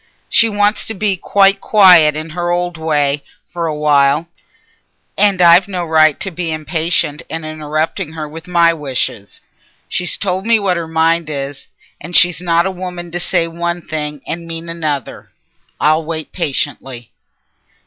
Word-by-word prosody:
She 225 - +4
wants 205 0 +1
to 220 - -6
be 200 0 0
quite 195 +2 +2
quiet 180 -8 +6
in 155 +1 -5
her 175 +1 -3
old 175 0 -1
way 150 -3 0 0.3
for 170 -1 -2
a 155 - -2
while. 150 +1 +2 0.9
And 200 -3 +3
I've 175 +3 +6
no 180 -3 -3
right 155 -2 +3
to 195 - -3
be 170 -1 -4
impatient 155 -1 -1
and 160 -1 -5
interrupting 155 +2 -3
her 155 -2 -5
with 160 +3 -11
my 170 -1 +3
wishes. 130 -9 -4 0.5
She's 180 - -1
told 190 +1 -2
me 230 -1 +5
what 195 -4 0
her 170 -1 -4
mind 160 0 +1
is, 140 -1 -5 0.3
and 170 +3 -6
she's 175 -1 +4
not 170 -1 +2
a 190 - -1
woman 180 -2 -7
to 175 - -3
say 175 -1 +1
one 170 +1 -3
thing 150 -3 -4
and 170 0 -5
mean 165 0 -6
another. 155 -6 -4 0.5
I'll 155 +2 +2
wait 160 -1 -5
patiently." 135 -6 -4
165 Hz, 160 wpm, -16 LUFS, 155-180 Hz, 0.9 s, quiet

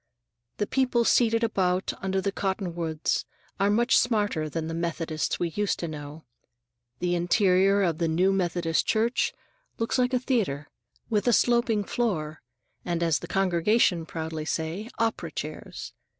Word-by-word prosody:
The 205 - 0
people 250 -1 +1
seated 230 -1 +3
about 190 -4 +1
under 190 0 0
the 200 - -1
cottonwoods 175 -5 -2 0.4
are 200 +1 +3
much 240 +5 +3
smarter 205 -10 0
than 160 +1 -3
the 165 - -4
Methodists 165 -2 -2
we 175 - 0
used 205 +4 -1
to 170 - -4
know. 150 0 -8 0.7
The 180 0 -1
interior 190 +3 +3
of 170 -4 0
the 170 - +1
new 180 +4 +2
Methodist 170 -4 0
Church 230 +3 +1 0.5
looks 230 +3 0
like 250 +1 +2
a - - +2
theater, 195 - -1 0.4
with 210 +1 +1
a 240 - +5
sloping 235 -3 +3
floor, 160 -10 -2 0.4
and 170 -1 -1
as 165 -3 +2
the - - -8
congregation 185 -1 +2
proudly 160 -1 -4
say, 160 +7 -3
"opera 225 0 -1
chairs." - - -6
185 Hz, 150 wpm, -27 LUFS, 165-220 Hz, 0.7 s, a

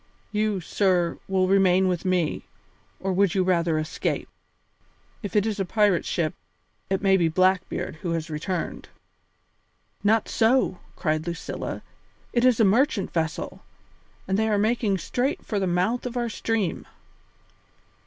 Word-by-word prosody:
You, 210 -2 0
sir, 180 -1 +1
will 190 -1 +2
remain 190 -1 +4
with 180 0 -1
me, 180 -4 0 0.5
or 190 0 -1
would 195 0 +2
you 190 - +3
rather 170 -3 +2
escape? 155 0 -2 0.9
If 205 -3 -6
it 205 0 +4
is 215 -2 -2
a - - +2
pirate 205 -1 +2
ship, 160 -3 -1 0.6
it 195 +1 -1
may 195 -1 +5
be 170 -3 +3
Blackbeard 185 -1 +1
who 170 +2 -3
has 165 -1 -2
returned." 165 +4 -4 1.1
"Not 220 +1 +3
so," 230 -5 +2 0.2
cried 155 -1 -1
Lucilla, 170 -1 -5 0.5
"it 240 - +2
is 250 -3 +4
a 220 - +6
merchant 225 0 +2
vessel, 160 -2 -2 0.7
and 190 +2 +1
they 220 0 +2
are 210 - +2
making 215 -1 +1
straight 265 - -2
for 210 - -1
the 190 - 0
mouth 185 +8 0
of 245 0 -5
our 240 -1 0
stream." 220 -5 -2
190 Hz, 145 wpm, -25 LUFS, 175-215 Hz, 1.1 s, a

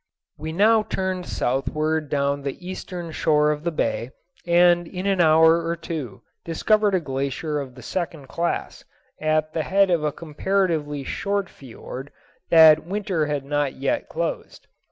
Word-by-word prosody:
We 155 +1 -4
now 215 +6 +4
turned 190 -3 -3
southward 155 +4 -1
down 140 0 0
the 140 +6 -6
eastern 180 -2 -6
shore 150 -1 +2
of 150 0 -4
the 170 - 0
bay, 125 -5 -1 0.4
and 175 0 +4
in 185 +2 -6
an 195 -2 +2
hour 160 +1 +5
or 165 +1 -1
two 150 - -6 0.2
discovered 205 +5 +2
a - - +3
glacier 140 +1 -3
of 130 -3 -7
the - - -12
second 165 -6 -4
class, 170 +5 -3 0.4
at 155 0 0
the 160 - 0
head 195 +3 +2
of 170 -3 +1
a 150 - +1
comparatively 160 -2 -1
short 200 +5 -2
fiord 130 +2 -10 0.4
that 160 -2 +7
winter 185 -3 -1
had 145 -2 -2
not 145 -1 -1
yet 135 +1 -2
closed. - - -4
160 Hz, 155 wpm, -23 LUFS, 145-180 Hz, 0.4 s, that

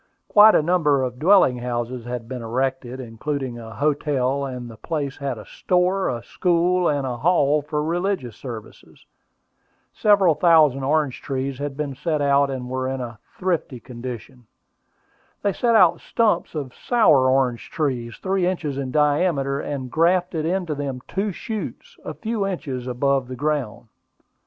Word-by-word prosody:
Quite 215 +1 +7
a - - +4
number 150 -5 +2
of 125 -1 -4
dwelling 170 -7 +5
houses 120 0 -3
had 120 -2 -5
been 125 -1 -6
erected, 130 +2 -2
including 130 +1 -4
a 110 -1 -10
hotel, 140 -2 0
and 125 -2 -6
the 115 - -10
place 140 +2 -4
had 135 -4 -3
a 105 - -10
store, 180 +2 0
a 120 -2 -4
school, 180 +2 +1
and 145 -2 0
a 125 -2 -3
hall 150 0 +3
for 150 +1 -2
religious 175 - -2
services. 115 -5 -10 0.9
Several 200 -5 +4
thousand 155 -4 +4
orange 145 -1 0
trees 135 0 -3
had 145 -1 -4
been 150 -2 -3
set 155 +3 -2
out, 140 0 +3
and 130 -2 -4
were 130 0 -2
in 135 0 -3
a 120 -3 -7 0.2
thrifty 170 -8 -2
condition. 125 0 -9 1.0
They 200 -1 +1
set 235 +2 +2
out 180 -6 +5
stumps 210 -8 0
of 140 -4 -4
sour 150 - +3
orange 130 -3 +1
trees, 130 -9 -2
three 190 -1 0
inches 155 -7 -2
in 135 -2 -3
diameter, 145 -1 +1
and 130 -4 -5
graft 175 +4 +2
into 165 +1 -1
them 140 -3 -4
two 200 +2 -2
shoots, 230 - -6
a - - -6
few 220 -3 -2
inches 135 -9 -4
above 135 +1 0
the 130 - -6
ground. 140 -5 -2
140 Hz, 155 wpm, -22 LUFS, 125-170 Hz, 1.0 s, Quite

